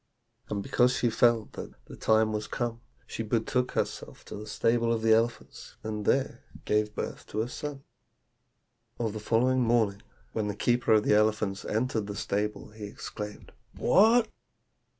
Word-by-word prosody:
And 100 -1 -2
because 125 +4 +3
she 120 - +1
felt 115 -1 +3
that - - -7
the - - -10
time 110 0 +2
was 105 0 -3
come, 120 -1 -3 0.2
she - - -5
betook 115 +3 0
herself - - -3
to - - -8
the 105 +1 -8
stable 115 0 +1
of 115 -1 0
the 110 0 +5
elephants, 115 +1 -1
and 105 -1 -4
there 135 0 +1 0.2
gave 105 0 +1
birth - - -5
to 110 +1 -1
a - - -4
son. 140 +2 -6 1.2
"On 115 -2 0
the 110 - -5
following 125 +4 +2
morning, 115 -4 +2 0.3
when 110 -2 -1
the 105 - -3
keeper 120 +3 +1
of 105 -1 +5
the - - +3
elephants 105 -2 +2
entered 110 -2 -1
the 100 - -5
stable, 105 +1 -2
he 105 -1 -8
exclaimed, 105 +1 -7 0.3
'What! 225 +4 +5
110 Hz, 165 wpm, -29 LUFS, 105-120 Hz, 1.2 s, the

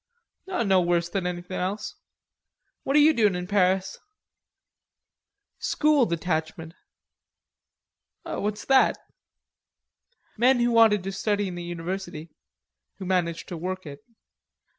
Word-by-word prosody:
"No 205 - +2
worse 175 -1 0
than 180 0 -2
anything 180 +1 -5
else. 200 +4 -3 0.9
What 275 - -1
are - - +7
you 305 +2 +6
doin' 210 -7 +2
in 180 0 -4
Paris?" 190 -1 +1 1.6
"School 300 -4 +2
detachment." 160 -1 -3 1.5
"What's 210 +1 -4
that?" 270 -1 +4 1.4
"Men 250 +3 +4
who 240 0 +2
wanted 220 -4 +5
to 195 - -4
study 205 0 -1
in - - -7
the 175 - -6
university, 175 -1 -6 0.7
who 190 - -7
managed 175 -3 -1
to 175 - -5
work 185 +2 -5
it." 140 -1 -10
185 Hz, 115 wpm, -25 LUFS, 175-210 Hz, 1.6 s, are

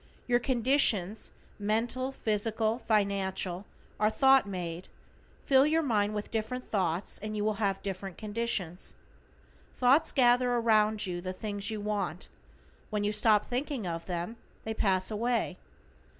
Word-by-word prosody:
Your 240 -1 +3
conditions, 235 -6 +1 0.3
mental, 235 +5 0
physical, 220 -1 0
financial, 200 -4 0 0.3
are 215 0 +4
thought 265 -1 +4
made; 175 -2 -5 0.6
fill 270 0 +5
your 320 +1 +2
mind 210 -5 +1
with 210 - -4
different 230 +3 -2
thoughts 185 -3 -1
and 215 0 -4
you 205 - -1
will 215 -1 0
have 195 -2 0
different 195 -2 -5
conditions. 210 -5 -3 0.8
Thought 260 +5 +4
gathers 245 -1 +4
around 215 -1 +3
you 175 -2 -4
the 185 +1 -4
things 205 +1 -3
you 215 -1 -4
want, 200 -4 -3 0.6
when 210 -1 -1
you 205 - +1
stop 210 0 +4
thinking 255 -2 -3
of 165 -1 -4
them 180 +5 -4 0.3
they 220 - -3
pass 190 -2 +1
away. 225 -3 -1
215 Hz, 135 wpm, -30 LUFS, 195-240 Hz, 0.8 s, fill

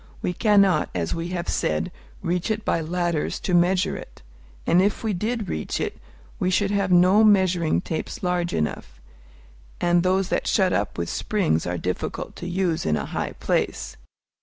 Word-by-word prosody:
We 180 - 0
cannot, 200 -1 +3
as 85 -2 -1
we 165 0 -3
have 175 -1 -4
said, 75 0 -1 0.3
reach 175 +4 -1
it 220 0 -2
by 165 - +1
ladders 170 -1 -1
to 180 - -2
measure 180 +2 +3
it; - - -11 0.4
and 175 +2 +4
if 205 +4 0
we 220 -2 0
did 215 +3 -2
reach 80 - -3
it, - - -3 0.4
we 185 - +1
should 200 +2 +1
have 200 -2 0
no 185 +4 +6
measuring 185 -6 +3
tapes 185 +7 -5
large 180 -1 0
enough, 65 -5 -3 0.8
and 175 0 +3
those 185 +1 +1
that - - -1
shut 190 -4 +3
up 100 - -1
with 85 -1 -2
springs 80 0 0
are 90 0 -2
difficult 90 +1 -4
to - - -6
use 180 -3 0
in 75 -1 +1
a - - -3
high - - -3
place. - - -2
180 Hz, 175 wpm, -24 LUFS, 160-195 Hz, 0.8 s, no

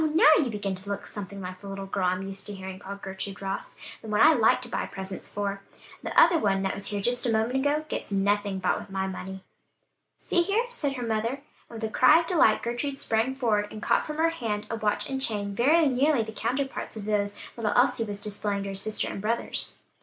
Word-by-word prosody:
now, - - +6
you 270 - +1
begin 205 -3 -2
to 190 +2 -7
look 200 0 -3
something 200 -1 -7
like 185 0 -7
the 200 - -9
little 195 0 -5
girl 195 -1 -1
I'm 185 +1 0
used 195 0 -5
to 205 - -5
hearing 190 0 -7
called 200 0 -8
Gertrude 190 0 -6
Ross; 195 0 -4 0.3
the - - -10
one 210 -1 0
I 315 +2 +8
like 230 -6 +4
to - - -1
buy - - -2
presents 190 -1 -7
for; 200 -1 -3 0.4
the - - +2
other 335 - +6
one 195 -4 +1
that 195 - 0
was 200 - -2
here 205 - -1
just 245 +4 +1
a - - +2
moment 225 +4 +1
ago, 290 +3 +1
gets - - -5
nothing 200 0 +1
bought 190 - +1
with - - -10
my 190 0 -2
money." 190 0 -6 0.7
"See 350 - +1
here," 405 +7 +1
said 295 - -1
her 250 -3 -4
mother, 230 +5 -1 0.3
and 230 - -8
with - - -8
a 220 - 0
cry 330 - +6
of - - -6
delight 330 - +3
Gertrude 240 +4 -2
sprang 230 +1 0
forward 215 -6 +1
and 215 - -7
caught - - +2
from 305 0 -5
her 325 +1 +3
hand 220 -9 -3
a - - 0
watch 210 -1 -1
and 265 -1 -3
chain 205 -5 0
very 305 +10 +4
nearly 275 -1 +3
the 220 - -7
counterparts 255 +2 -2
of 205 - -6
those 205 -1 0 0.2
little 220 -3 -1
Elsie 250 -1 +3
was 205 -2 -4
displaying 205 -1 -2
to 200 - -4
her - - -4
sister 210 +2 -1
and - - -5
brothers. 230 +3 -1
215 Hz, 235 wpm, -27 LUFS, 195-250 Hz, 0.7 s, I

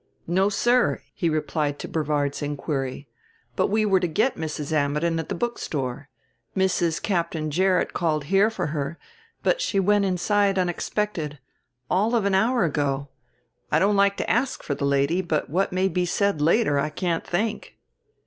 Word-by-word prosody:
"No, 190 +4 +2
sir," 215 - +2
he 170 - 0
replied 155 -2 -1
to - - -6
Brevard's 150 -2 -1
inquiry. 140 -2 -3 0.5
"But - - +2
we 215 +1 +1
were 195 -2 +4
to 180 - 0
get 215 +11 +1
Mrs. 155 -2 -4
Ammidon 150 +3 +1
at 160 - -5
the - - -2
bookstore. 145 - -3 0.5
Mrs. 175 -3 +1
Captain 165 -5 -1
Gerrit 185 +3 +2
called 155 -4 0
here 195 +8 +3
for 220 - -3
her, 150 +2 -3 0.5
but - - +2
she 200 - 0
went 205 +1 +3
inside 195 +2 +1
unexpected. 175 -3 -2 0.5
All 210 - +1
of 220 -4 +1
an 200 - +1
hour 230 +4 +3
ago. 140 -3 -1 0.6
I - - +4
don't 205 +2 +3
like 200 0 +3
to - - -2
ask 255 +3 0
for 145 - -2
the 140 - -2
lady, 140 +6 +2
but 160 -6 -2
what 190 +4 +1
may 185 +1 +1
be 180 -1 0
said 200 -4 +1
later 155 -2 +3
I 150 - 0
can't 165 +2 -2
think." 210 +5 -3
175 Hz, 170 wpm, -24 LUFS, 150-200 Hz, 0.6 s, were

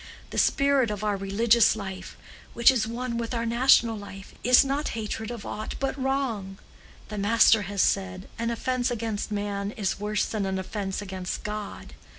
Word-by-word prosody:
The - - -1
spirit 275 -4 +3
of 210 0 -4
our 210 -1 +1
religious 215 +4 +3
life, 190 -3 -7 0.4
which 235 +3 +6
is 230 -4 0
one 235 0 -3
with 235 +1 -3
our 230 0 -1
national 235 -1 +4
life, 200 -2 -10
is 250 +2 +6
not 280 +2 -1
hatred 220 0 -4
of 235 -4 -7
aught 215 +1 -5
but 270 -1 -1
wrong. 260 -8 -2 0.5
The 210 -1 -4
Master 220 +1 +5
has 200 -2 +1
said, 190 -1 -1
an 230 0 -1
offence 245 +2 -1
against 225 -3 -3
man 205 -1 -2
is 200 -3 -2
worse 210 +1 0
than 210 -3 -2
an 190 0 -1
offence 195 +1 -4
against 190 -2 -5
God. 210 -1 -6
215 Hz, 170 wpm, -26 LUFS, 200-235 Hz, 0.5 s, which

